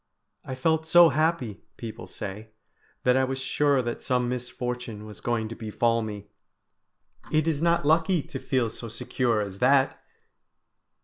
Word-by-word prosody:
"I 130 - -5
felt 160 +4 +1
so 170 +1 +8
happy," 155 - 0 0.2
people 115 -2 -7
say, 105 +2 -7 0.5
"that 125 0 +4
I 130 - +3
was 130 0 -1
sure 135 0 +2
that 120 0 -4
some 125 -1 0
misfortune 125 -3 -4
was 105 -5 -11
going 115 -2 -1
to 115 - -6
befall 115 +1 0
me 105 -2 -6 1.1
it 155 0 +2
is 155 -2 0
not 170 -1 +2
lucky 165 +1 +3
to - - -7
feel 125 -4 0
so 115 - -7
secure 115 0 0
as 100 -1 -5
that!" 135 +1 +3
125 Hz, 150 wpm, -26 LUFS, 110-150 Hz, 1.1 s, so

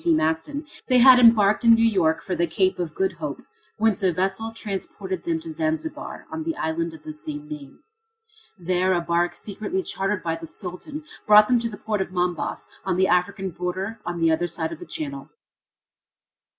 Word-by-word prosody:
T. 165 - +4
Maston, 160 - -1 0.2
they 255 - +4
had 255 +1 +9
embarked 225 -3 +5
in 230 -1 +8
New 225 0 +3
York 165 -7 +2
for 185 - -3
the 170 0 +1
Cape 185 +3 +1
of 165 -4 -3
Good 190 0 +1
Hope, 150 -3 -5 0.3
whence 220 -3 +2
a 190 -2 +3
vessel 190 +6 -1
transported 195 -4 -5
them 165 -1 0
to 160 - -7
Zanzibar, 160 - -3
on 320 - -4
the 325 0 -2
island 165 - -2
of 155 - -15
the 155 - -7
same 150 -1 -7
name. 145 -3 -9 0.7
There 185 +1 +1
a 175 - +1
bark 170 +1 0
secretly 220 - -4
chartered 195 - -2
by 165 -1 -1
the 165 0 -9
Sultan 200 - -7 0.2
brought 210 0 +8
them 250 -1 +3
to 230 0 -2
the 205 - -8
port 210 -1 -2
of - - -2
Mombas, 180 -2 -2 0.2
on 185 -1 -1
the 190 0 +4
African 190 +1 +1
border 185 +6 -4
on 175 -1 -4
the 165 -1 +3
other 165 +2 +1
side 165 -1 -3
of 165 - -7
the - - -10
channel. 140 -1 -5
180 Hz, 195 wpm, -24 LUFS, 165-210 Hz, 0.7 s, had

